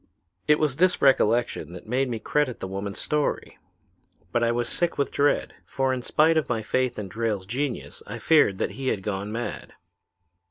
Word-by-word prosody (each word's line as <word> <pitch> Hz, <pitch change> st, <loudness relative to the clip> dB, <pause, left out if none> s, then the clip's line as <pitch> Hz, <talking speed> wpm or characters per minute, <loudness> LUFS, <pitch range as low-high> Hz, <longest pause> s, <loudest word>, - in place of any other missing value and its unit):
"It 150 Hz, 0 st, +5 dB
was 150 Hz, -4 st, 0 dB
this 180 Hz, +2 st, +3 dB
recollection 120 Hz, -8 st, +2 dB
that 90 Hz, -, -10 dB
made 125 Hz, +4 st, 0 dB
me 115 Hz, -, -2 dB
credit 130 Hz, +3 st, 0 dB
the -, -, -4 dB
woman's 100 Hz, +2 st, -5 dB
story. 150 Hz, -1 st, -2 dB, 0.7 s
But 120 Hz, -, +1 dB
I 115 Hz, -, +3 dB
was 120 Hz, 0 st, -1 dB
sick 175 Hz, +6 st, -1 dB
with 140 Hz, -, 0 dB
dread, 145 Hz, +1 st, +1 dB
for 135 Hz, -1 st, -1 dB
in 130 Hz, -, -2 dB
spite 160 Hz, +6 st, +3 dB
of 155 Hz, -, 0 dB
my 115 Hz, -2 st, -1 dB
faith 130 Hz, +3 st, 0 dB
in 105 Hz, -, -4 dB
Drayle's 105 Hz, -1 st, -2 dB
genius 130 Hz, +5 st, -4 dB
I 110 Hz, -, -5 dB
feared 115 Hz, -6 st, +4 dB
he 135 Hz, 0 st, -3 dB
had 100 Hz, -6 st, 0 dB
gone 100 Hz, 0 st, -3 dB
mad. 120 Hz, +2 st, -5 dB
120 Hz, 185 wpm, -25 LUFS, 105-140 Hz, 0.7 s, It